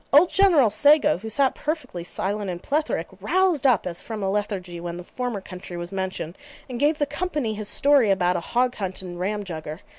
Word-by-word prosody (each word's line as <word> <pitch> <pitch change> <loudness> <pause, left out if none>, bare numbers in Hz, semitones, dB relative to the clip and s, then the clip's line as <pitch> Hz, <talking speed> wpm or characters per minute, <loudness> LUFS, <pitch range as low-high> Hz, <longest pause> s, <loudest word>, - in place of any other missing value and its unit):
Old 305 +6 +6
General 335 - +5
Sago, 290 - +5
who 220 +3 -6
sat 270 +4 +2
perfectly 300 - -4
silent 200 +3 -2
and 175 -1 -5
plethoric, 300 +2 0
roused 365 -7 +2
up 245 -7 +3
as 175 -1 -4
from 220 -3 -5
a 190 - 0
lethargy 195 -4 -3
when 170 0 -5
the 180 - -7
former 245 +1 -4
country 180 -1 -8
was 175 0 -6
mentioned, 190 -3 -4 0.3
and 250 -3 -5
gave 295 +2 +3
the 290 - +1
company 290 -5 -2
his 210 -1 -2
story 280 -6 +4
about 180 -2 +2
a - - +1
hog 245 +8 0
hunt 190 -3 -4
at 185 - -7
Ramjugger. 175 -3 -4
210 Hz, 200 wpm, -24 LUFS, 180-280 Hz, 0.3 s, Old